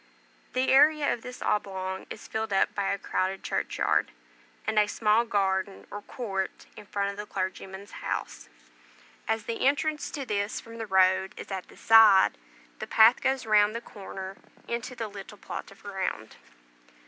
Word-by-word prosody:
The 255 +1 +1
area 295 +2 +5
of 235 - -6
this 250 +1 -8
oblong 190 -2 -2
is - - -9
filled 220 -1 -3
up 195 - +2
by 200 -1 -1
a 200 - 0
crowded 190 0 -2
churchyard, - - 0 0.6
and 220 0 +2
a 210 - +4
small 215 +2 +2
garden 195 -2 -1
or 205 - -6
court 195 -4 -4
in 205 - -12
front 200 0 -1
of 200 - -11
the 210 0 -6
clergyman's 190 +1 -5
house. - - -5 0.8
As 220 0 0
the 230 +1 -3
entrance 300 +2 0
to 280 -2 -5
this 205 -2 -1
from 230 0 -11
the 225 - -4
road 190 0 +3
is - - -8
at 190 -1 -4
the - - -17
side, 210 - +6 0.4
the - - -5
path 225 +3 +6
goes 265 -2 0
round 215 0 +4
the - - -1
corner 195 -3 -8 0.3
into 235 +2 -4
the 225 -2 -4
little 205 0 -10
plot - - -7
of 195 - -17
ground. 190 - -4
205 Hz, 170 wpm, -28 LUFS, 195-230 Hz, 0.8 s, side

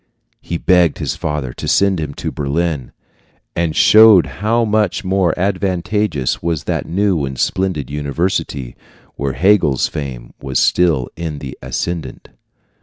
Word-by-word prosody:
He 85 - -4
begged 90 -2 +3
his - - -3
father 75 -5 -3
to - - -6
send 100 -3 +2
him 75 -2 -4
to - - -4
Berlin, 75 -1 -2 0.6
and 85 -2 -1
showed 110 -4 +7 0.2
how 115 +2 +2
much 105 -2 0
more 95 -3 +1
advantageous 95 - -1
was 85 -2 -2
that - - -2
new 95 -3 +1
and 65 -1 -4
splendid 90 -8 -1
university, 75 -3 -2 0.4
where 70 -1 -2
Hegel's 90 -6 +3
fame 65 -4 -7
was 65 -2 -2
still 80 -8 +2
in 80 -3 -5
the 65 -2 -7
ascendent. 80 -7 -4
85 Hz, 135 wpm, -17 LUFS, 70-95 Hz, 0.6 s, showed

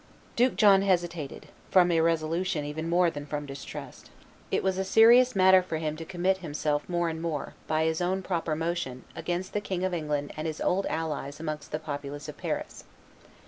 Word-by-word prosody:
Duke 245 +2 +3
John 200 -3 +6
hesitated, 175 -6 -1 0.2
from 180 -2 +5
irresolution 165 0 +1
even 160 +3 -4
more 175 0 +3
than 145 -1 -7
from 145 0 -4
distrust. 135 -1 -9 0.4
It - - 0
was 190 0 0
a - - +1
serious 235 +5 +6
matter 190 0 +6
for 180 -3 -4
him 155 -1 -2
to 165 - -7
commit 185 +2 0
himself 150 -2 -2
more 175 -1 0
and 160 -1 -3
more, 160 -4 -3
by 155 0 +1
his 160 +1 0
own 190 +2 0
proper 170 -4 -1
motion, 160 -6 -3
against 175 +3 -3
the 210 - 0
King 185 -3 -3
of 185 - -1
England 150 -3 -2
and 155 +1 -3
his 155 -1 -4
old 195 +2 +1
allies 150 -3 -3
amongst 155 -2 -5
the 155 - -1
populace 145 -1 -6
of 150 - -7
Paris. - - -4
165 Hz, 185 wpm, -28 LUFS, 150-185 Hz, 0.4 s, John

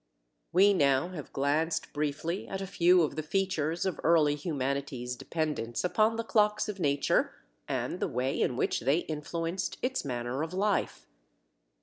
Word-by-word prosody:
We 200 +3 +6
now 140 -1 +3
have 165 -6 -8
glanced 155 +4 0
briefly 150 +5 -2
at 195 - -4
a 195 - -3
few 180 -1 +4
of 155 - -2
the 155 - -2
features 170 -1 -1
of 190 - -2
early 160 -3 +4
humanity's 140 -4 -3
dependence 145 -5 -3
upon 215 +6 +2
the 230 - -2
clocks 210 -1 +2
of 205 -2 -5
nature 140 -4 +1 0.3
and - - -2
the - - 0
way 130 +2 -1
in 125 - +1
which - - +1
they 140 +8 +2
influenced 165 +4 -3
its 260 +1 0
manner 125 0 -3
of 165 +3 -4
life. 205 +2 0
160 Hz, 155 wpm, -30 LUFS, 140-185 Hz, 0.3 s, We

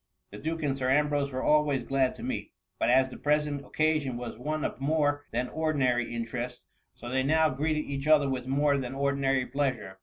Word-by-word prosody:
The 105 - -9
duke 160 +3 -3
and 140 -2 0
Sir 130 -1 -1
Ambrose 145 0 +2
were 130 0 -3
always 150 -4 +3
glad 135 0 +1
to - - -10
meet, - - -4 0.3
but - - +2
as 130 +1 +4
the - - -9
present 150 -1 0
occasion 155 -5 0
was 120 -1 -6
one 150 +6 -3
of - - -4
more 145 0 +1
than 125 +2 -1
ordinary 135 -7 0
interest, 120 +1 -4 0.3
so 120 - -10
they 130 +2 +1
now 155 +3 +3
greeted 150 +3 -1
each 140 +1 -4
other 150 -2 +5
with 130 -2 -3
more 140 +1 +2
than 130 0 -5
ordinary 135 -1 +1
pleasure. 125 -9 -2
140 Hz, 195 wpm, -28 LUFS, 130-150 Hz, 0.3 s, other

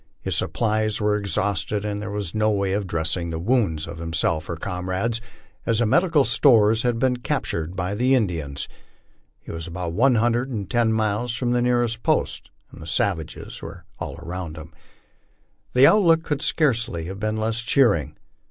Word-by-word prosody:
His - - -3
supplies 110 -1 0
were 105 -1 +2
exhausted, 100 0 -1
and 105 -1 -3
there 105 - -5
was 100 -5 -3
no 110 0 +2
way 100 -2 0
of 100 -1 -1
dressing 85 +1 -1
the 80 - -3
wounds 90 -5 +1
of 85 0 -8
himself 80 -1 -1
or 85 - -2
comrades, 95 +6 -2 0.4
as 115 -2 +1
the 120 - +2
medical 165 - +3
stores 115 -2 +4
had 120 -1 0
been 125 +1 +1
captured 95 - -2
by 95 +1 -2
the 125 +5 +3
Indians. 80 - -2 0.7
He - - -10
was 80 +1 -6
about 85 0 -4
one 125 +6 +4
hundred 120 +3 +1
and 105 -7 -4
ten 120 -2 +2
miles 110 +2 0
from 120 -1 -1
the 120 0 +2
nearest 120 -2 +1
post, - - 0 0.2
and 80 - -9
savages 85 -3 -2
we're - - -9 0.2
all - - -5
around 85 -2 -6
him. 80 +1 -10 1.0
The 125 +2 +6
outlook 165 -3 +5
could 150 -3 -2
scarcely 115 - 0
have 95 +3 -7
been 110 +1 -1
less 110 +1 -1
cheering. 115 - +2
105 Hz, 170 wpm, -23 LUFS, 90-120 Hz, 1.0 s, The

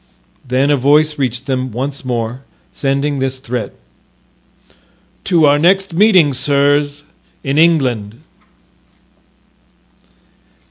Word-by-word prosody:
Then 130 +2 0
a 145 - +2
voice 150 +3 +2
reached 125 -1 -2
them 130 -2 -3
once 135 +5 -5
more, 120 0 -4 0.3
sending 140 +1 -1
this 130 0 -2
threat: 125 -5 -5 1.5
"To 170 -5 +3
our 145 0 +3
next 190 +3 +2
meeting, 180 -6 +4
sirs, 145 +2 0 0.4
in 140 +2 0
England." 125 -10 +1
140 Hz, 95 wpm, -15 LUFS, 130-150 Hz, 1.5 s, meeting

